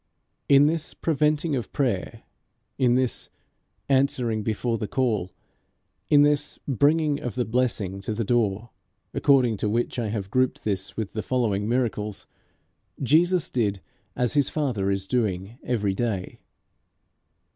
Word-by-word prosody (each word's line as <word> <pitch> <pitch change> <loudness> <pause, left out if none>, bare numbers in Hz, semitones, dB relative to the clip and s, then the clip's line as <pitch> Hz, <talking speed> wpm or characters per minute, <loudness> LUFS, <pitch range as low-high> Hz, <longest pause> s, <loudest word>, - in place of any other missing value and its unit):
In 140 +1 +7
this 160 +1 -1
preventing 150 0 +1
of 120 - -4
prayer, 120 -10 -2 0.6
in 125 -2 +4
this 130 -1 -1 0.6
answering 130 -5 +2
before 115 +2 -1
the 105 - -3
call, 110 -8 0 0.8
in 145 -1 +6
this 145 0 +1
bringing 145 +2 +2
of 120 - -5
the 125 -1 0
blessing 110 -5 -1
to 105 +2 -3
the 115 - -1
door, 110 -1 0 0.4
according 130 -6 +3
to 105 - -1
which 120 +3 -1
I 115 - -1
have 100 -2 -4
grouped 130 +1 +1
this 95 -3 -3
with 110 -3 -4
the 110 - -2
following 110 -5 0
miracles, 110 -4 -1 0.8
Jesus 170 +5 +3
did 105 -5 0 0.4
as 125 -2 0
his 145 -2 +2
Father 125 -11 -1
is 95 0 -1
doing 105 -1 -2
every 105 -5 0
day. 100 -4 -3
120 Hz, 135 wpm, -25 LUFS, 105-135 Hz, 0.8 s, In